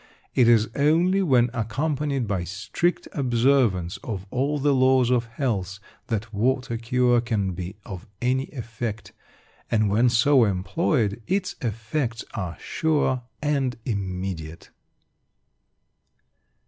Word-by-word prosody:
It 125 -3 +4
is 115 -2 +5
only 170 +7 +3
when 125 -9 +3
accompanied 135 +3 -1
by 95 -3 -1
strict 100 - -2
observance 120 - +2
of 100 -6 -6
all 140 +4 0
the 145 0 +2
laws 130 -1 +4
of 120 -2 +2
health 110 -6 -2 0.3
that 110 -1 -3
water 125 +3 0
cure 120 +1 +2
can 105 -5 -1
be 90 +1 -6
of 95 -3 -8
any 130 +2 +1
effect; 115 -5 -6 0.6
and 110 -3 +2
when 115 +4 +4
so 125 +2 +4
employed, 105 - 0
its 190 0 0
effects 115 +2 -2
are 90 -5 -4
sure 150 -5 0 0.2
and 135 -5 0
immediate. 90 - -4
120 Hz, 115 wpm, -24 LUFS, 100-135 Hz, 0.6 s, is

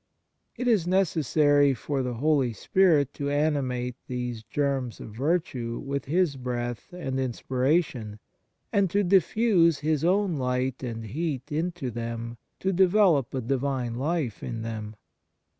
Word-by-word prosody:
It 250 +1 -2
is 210 -8 +3
necessary 150 -6 +3
for 135 +3 -2
the 125 -1 -3
Holy 135 -2 +2
Spirit 155 - +3
to 140 0 -3
animate 140 -4 0
these 125 -3 -4
germs 135 -1 -2
of - - -8
virtue 130 -5 -1
with 140 0 -4
His 160 -1 +1
breath 120 -3 -4
and 135 -7 -3
inspiration, 130 -2 0 0.6
and 200 -2 +3
to 205 +4 +2
diffuse 185 -3 +3
His 155 -1 0
own 185 -1 +2
light 125 0 -1
and 115 -3 -5
heat 140 +3 -3
into 160 -3 -2
them 115 0 -5 0.2
to 190 0 +1
develop 185 - +4
a 130 - -1
Divine 130 -1 -1
life 140 -1 -2
in 115 -3 -4
them. 110 -1 -5
140 Hz, 135 wpm, -27 LUFS, 125-165 Hz, 0.6 s, develop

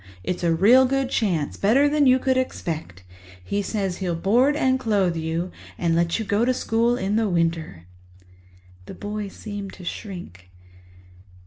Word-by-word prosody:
It's 180 -1 -3
a 170 - +2
real 235 +10 +6
good 270 0 -1
chance—better 210 - +2
than 290 -1 +3
you 255 0 +6
could 260 0 +1
expect. 160 - -3 0.4
He 200 - -2
says 195 -3 -2
he'll 180 -3 -2
board 240 - +3
and 260 -3 +2
clothe 200 -8 +1
you 165 +2 -3 0.3
and 170 -1 +1
let 170 0 +1
you 225 - -3
go 205 +3 +1
to 255 +1 +2
school 235 +1 +1
in 200 +1 -1
the 220 -2 +1
winter." 165 - -1 1.0
The - - -8
boy 210 0 -5
seemed 200 0 -7
to 180 - -11
shrink. 170 - -8
200 Hz, 155 wpm, -23 LUFS, 170-240 Hz, 1.0 s, real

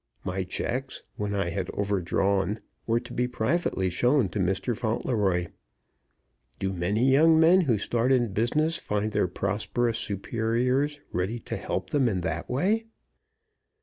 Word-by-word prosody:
My 95 +1 -2
checks, 130 +8 -4
when 105 -1 -2
I 100 -3 0
had 95 +1 -3
overdrawn, 100 +1 0 0.3
were 115 +1 +2
to 120 +1 -10
be 125 0 0
privately 120 - 0
shown 125 +4 +2
to 105 - -4
Mr. 95 +6 0
Fauntleroy. 105 -6 0 1.1
Do 95 0 -2
many 105 +9 +1
young 160 +4 +6
men 170 +4 +6
who 125 -10 +2
start 120 +5 0
in 120 -6 +2
business 155 +10 +1
find 105 -4 -2
their 105 -3 +1
prosperous 110 +5 -1
superiors 120 +8 0
ready 95 +7 -1
to - - -5
help - - -4
them 135 -5 +3
in 95 -4 -1
that 90 - -3
way? 200 - +1
110 Hz, 145 wpm, -27 LUFS, 95-130 Hz, 1.1 s, young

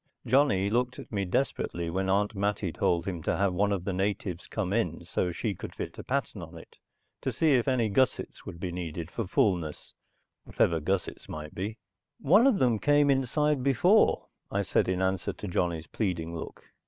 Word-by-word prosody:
Johnny 125 -6 +3
looked 125 +4 0
at - - -10
me 100 -3 -1
desperately 90 -4 -1
when 95 +3 -1
Aunt 100 +2 +2
Mattie 100 -2 -1
told 85 -1 +1
him 90 -4 -3
to - - 0
have 100 -1 +2
one 100 +3 +2
of 95 -3 -1
the 100 - -2
natives 95 -2 -2
come 100 -3 -2
in 115 +1 -1
so 90 - -1
she 105 +4 -2
could - - -8
fit - - -5
a - - -6
pattern - - -2
on - - -9
it, - - -14 0.4
to - - -1
see 160 -3 +3
if 125 -1 +2
any 125 -4 +2
gussets 125 +5 0
would 85 - -8
be 90 0 -3
needed 85 -1 -5
for 115 -5 -3
fullness 90 -6 0 0.5
whatever 85 -1 +1
gussets 95 +4 -2
might 75 0 -7
be. 105 +5 -4 0.4
"One 200 - +5
of 255 -7 +4
them 120 - +2
came 145 +2 +4
inside 140 +2 +1
before," 140 - +4 0.2
I - - 0
said - - +1
in 95 0 0
answer 95 0 0
to 105 - -7
Johnny's 85 -2 -1
pleading 85 -6 -2
look. 80 - -7
100 Hz, 190 wpm, -29 LUFS, 90-125 Hz, 0.5 s, One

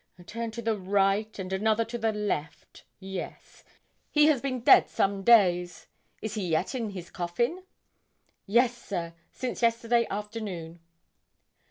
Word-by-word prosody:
A 175 - -14
turn 230 +6 -5
to 235 +1 -7
the 225 0 +1
right 200 +2 0
and 190 -1 -5
another 220 +3 +1
to 240 +1 -5
the 225 0 +1
left 205 -8 -4
yes. 190 -2 -8 0.5
He 300 0 +4
has 300 -5 +3
been 255 -3 -3
dead - - +6
some 195 0 0
days. 180 -6 +4 0.4
Is 220 - -3
he 205 -4 -3
yet 165 +6 0
in 235 -4 -2
his 185 -4 -8
coffin?' 235 - -2 0.9
'Yes, 240 +4 +3
sir; 175 -8 -5 0.2
since 255 -1 -5
yesterday 235 0 +2
afternoon.' 200 -6 -6
210 Hz, 145 wpm, -28 LUFS, 185-235 Hz, 0.9 s, dead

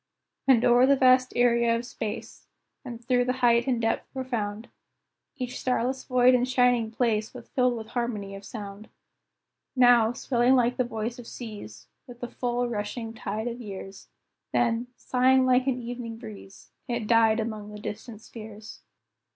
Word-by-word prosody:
And 250 -3 +5
o'er 245 +2 +5
the 280 - +5
vast 255 -1 +4
area 235 -1 +3
of 235 +1 -3
space, 220 -4 -6 0.4
And 240 -3 -9
through 245 0 +3
the 255 - 0
height 235 +1 +4
and 250 -3 +1
depth 225 0 -1
profound, 230 -5 -4 0.7
Each 250 -3 -5
starless 255 +1 -1
void 250 0 +4
and 250 0 +2
shining 245 -3 +3
place 220 -2 -1
Was - - -11
filled 250 -2 +1
with 220 -1 -8
harmony 220 -5 -3
of 195 0 -9
sound. 205 -1 -8 0.9
Now, 245 -3 +5
swelling 245 +1 +2
like 245 -1 +2
the 255 - +2
voice 230 +1 -4
of 235 - -10
seas, 205 - -9 0.2
With 245 -1 -12
the 245 - -4
full, 245 0 -1
rushing 225 +1 -4
tide 220 +1 -4
of 240 +1 -5
years, 195 -2 -9 0.4
Then, 235 0 +1
sighing 260 +1 +3
like 255 +1 +3
an 255 -2 0
evening 235 -1 -6
breeze, 210 -4 -12 0.2
It 235 -2 -2
died 225 0 +4
among 215 -2 -4
the 210 - -9
distant 215 +1 -7
spheres. 215 -1 -11
235 Hz, 160 wpm, -27 LUFS, 220-250 Hz, 0.9 s, And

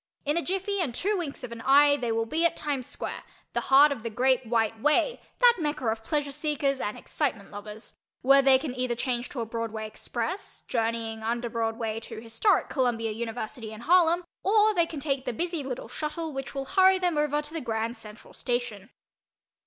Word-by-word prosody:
In 295 +2 +1
a 340 - +2
jiffy 385 +2 -1
and 260 -9 -2
two 410 +8 0
winks 320 -9 -4
of 250 - -6
an 230 -1 -7
eye 285 +3 +6
they 245 -5 -2
will 225 0 0
be 315 +9 -1
at 335 -1 +3
Times 280 -4 -2
Square, - - -5 0.3
the - - 0
heart 280 +2 +7
of 275 - -3
the 230 - -4
"Great 255 +2 +2
White 225 -1 +1
Way" 300 - +2 0.2
(that 485 -1 +6
Mecca 300 -4 -2
of 220 0 -3
pleasure 290 +3 -1
seekers 285 -2 -1
and 210 - -3
excitement 235 -10 -3
lovers) 210 +2 -9 0.3
where 275 +2 +7
they 270 -1 +6
can 265 -1 -4
either 250 -1 -1
change 245 0 -2
to 250 - -4
a - - -2
Broadway 225 -1 -4
Express, 240 - -5
journeying 225 -1 -1
under 235 +1 -2
Broadway 225 -1 -2
to 225 - -8
historic 230 - +1
Columbia 235 -4 0
University 225 0 -5
and 220 +2 -9
Harlem, 345 +1 +4 0.2
or 430 +2 +4
they 340 -4 +2
can 315 - -6
take 275 -2 -1
the 250 - -2
busy 335 +5 -2
little 265 -2 -5
"shuttle" 310 +1 -4
which 270 +1 -6
will 275 0 -3
hurry 380 +4 +5
them 360 -3 0
over 295 0 +1
to 300 +1 -7
the 325 - -3
Grand 225 -1 -2
Central 215 -2 -11
Station. 240 -5 -3
260 Hz, 200 wpm, -27 LUFS, 225-305 Hz, 0.3 s, heart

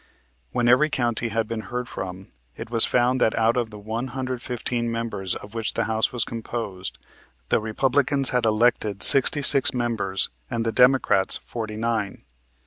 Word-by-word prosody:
When 120 - 0
every 130 +6 +4
county 120 -5 -1
had 110 0 -2
been 115 0 -4
heard 125 0 -4
from 95 -1 -8 0.2
it - - -9
was 115 -2 +5
found 125 +1 +1
that 110 - +2
out 115 +1 +2
of 120 -3 -1
the 105 - -11
one 110 +4 -5
hundred 130 -2 -4
fifteen 120 -1 -2
members 110 -5 -4
of 105 - -10
which 115 -2 -3
the - - 0
House 110 0 0
was 120 -2 -1
composed, 110 -5 -6 0.5
the - - +2
Republicans 135 +4 0
had 125 -1 0
elected 110 -2 +1
sixty 140 +2 +7
six 135 -1 +4
members 110 - -1 0.2
and 115 -1 -3
the 115 - 0
Democrats, 125 -6 +3
forty 110 -2 -7
nine. 110 -3 -3
115 Hz, 170 wpm, -23 LUFS, 110-125 Hz, 0.5 s, sixty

